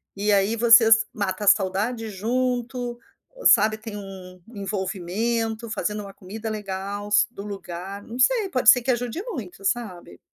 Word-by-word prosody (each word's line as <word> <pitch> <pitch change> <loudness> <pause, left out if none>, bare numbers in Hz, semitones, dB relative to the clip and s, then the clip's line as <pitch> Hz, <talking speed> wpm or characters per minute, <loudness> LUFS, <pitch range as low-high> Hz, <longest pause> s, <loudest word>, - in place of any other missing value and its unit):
e 205 +1 0
aí 200 +3 +2
vocês 230 -1 +6
mata 200 -1 -3
a - - -4
saudade 210 +4 +2
junto, 245 +3 -2 0.5
sabe 215 -1 +5
tem 220 -1 -8
um 185 -2 -10
envolvimento, 215 +3 -3
fazendo 210 -1 -3
uma 195 -1 -10
comida 215 +4 -7
legal 205 0 -5 0.2
do 200 - -9
lugar, 195 0 -7
não 235 +4 -9
sei 435 - +3
pode 250 -6 +4
ser 250 - +7
que 260 - +1
ajude 245 +7 -3
muito 195 - -8
sabe? 190 - -3
210 Hz, 145 wpm, -24 LUFS, 195-235 Hz, 0.5 s, ser